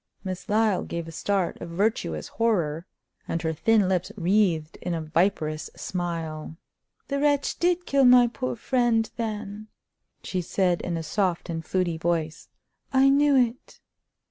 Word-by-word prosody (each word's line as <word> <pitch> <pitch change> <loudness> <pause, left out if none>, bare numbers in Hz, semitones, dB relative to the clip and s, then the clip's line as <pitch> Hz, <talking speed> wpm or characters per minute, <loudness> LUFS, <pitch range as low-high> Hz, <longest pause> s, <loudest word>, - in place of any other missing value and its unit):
Miss 185 -2 -6
Lyle 210 -2 +2
gave 170 -1 -5
a - - -7
start 190 +2 -1
of 170 - -6
virtuous 170 - -1
horror, 175 -8 0 0.4
and 165 - -1
her 160 0 0
thin 210 +4 +3
lips 185 -2 0
wreathed 175 -4 +1
in 175 -1 -2
a 165 - -3
viperous 155 -1 0
smile. 165 -3 -4 0.5
"The 280 0 -1
wretch 285 -1 +1
did 355 0 +1
kill 275 -1 +3
my 250 0 +8
poor 250 +2 -3
friend, 235 -2 +1
then," 215 -2 -4 0.6
she 185 - -2
said 180 0 0
in 170 -2 -3
a 165 - -4
soft 175 +1 -1
and 165 0 -4
fluty 175 -2 -1
voice. 165 -1 -2 0.4
"I 270 0 +5
knew 285 +1 +4
it!" 250 -1 0
185 Hz, 150 wpm, -26 LUFS, 165-230 Hz, 0.6 s, my